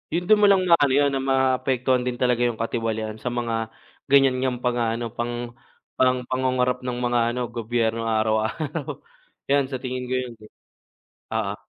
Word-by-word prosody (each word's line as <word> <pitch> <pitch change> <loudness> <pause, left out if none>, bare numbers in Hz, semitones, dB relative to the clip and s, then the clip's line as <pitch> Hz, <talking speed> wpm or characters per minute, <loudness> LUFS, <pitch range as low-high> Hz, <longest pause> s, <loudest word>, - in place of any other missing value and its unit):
Yun 175 - 0
dun 215 +2 +5
mo 205 - +7
lang 190 -2 +4
maano 155 -6 +4
yun 145 0 +3
na 135 - 0
maapektuhan 130 -1 +1
din 125 - -1
talaga 125 -1 +1
yung 115 -2 -3
katiwalian 110 -1 -3
sa - - -5
mga 115 -2 -2 0.4
ganyan 135 -2 +5
niyang 125 -1 -2
pang-aano, 120 -1 -1
pang 120 0 -4 0.5
pang 125 -1 +3
pangungurap 125 -1 +1
ng 125 -1 -4
mga 120 -1 +1 0.2
ano 125 - -2
gobyerno 115 0 -1
araw-araw. 110 +7 -1 0.5
Yan 140 -2 +3
sa 135 - -5
tingin 125 -1 -4
ko 130 - 0
yun, 125 -2 -3 1.0
oo. - - -1
125 Hz, 160 wpm, -24 LUFS, 115-130 Hz, 1.0 s, mo